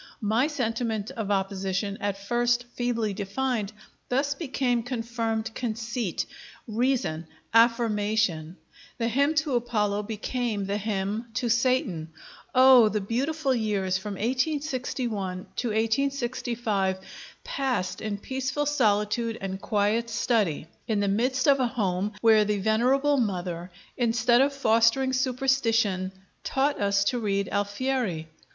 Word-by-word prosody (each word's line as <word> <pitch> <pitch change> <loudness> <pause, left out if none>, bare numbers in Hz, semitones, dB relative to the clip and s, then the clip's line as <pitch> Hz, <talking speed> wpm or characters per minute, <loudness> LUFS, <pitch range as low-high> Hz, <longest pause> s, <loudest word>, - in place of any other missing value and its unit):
My 225 +7 +2
sentiment 230 -5 -2
of 225 -6 -4
opposition, 195 0 -1
at 200 -1 -1
first 240 +4 +1
feebly 230 -4 -1
defined, 210 +2 -2 0.4
thus 280 +3 +1
became 260 -5 -1
confirmed 225 -2 -3
conceit, 230 -3 -3 0.4
reason, 225 -8 0 0.3
affirmation; 215 -7 +2 0.4
the 230 -3 0
hymn 280 +6 +2
to 305 -2 +1
Apollo 210 -4 0
became 220 0 -2
the 200 +1 -1
hymn 210 +2 -2
to 250 -1 0
Satan. 230 -9 +1 0.5
Oh! 255 -3 +8
the 210 - -1
beautiful 270 +7 -1
years 200 -5 0
from 205 +1 -5
1861 250 -6 -2
to 245 - -1
1865, 225 -3 0 0.5
passed 250 -10 -2
in 215 -2 -3
peaceful 265 +6 -2
solitude 225 -4 +1
and 190 0 -5
quiet 215 +3 +1
study, 220 - 0 0.2
in 220 -3 +1
the 200 - +1
midst 255 +7 +1
of 275 -1 +5
a 255 - +2
home 205 -4 -1
where 220 -2 +6
the 210 0 0
venerable 255 +8 +2
mother, 180 -6 -2 0.3
instead 240 0 +3
of 280 +1 +3
fostering 260 0 +3
superstition, 240 -7 +1 0.3
taught 275 -1 0
us 200 0 +2
to 245 +5 0
read 200 -3 0
Alfieri. 205 -4 -1
225 Hz, 120 wpm, -26 LUFS, 205-255 Hz, 0.5 s, Oh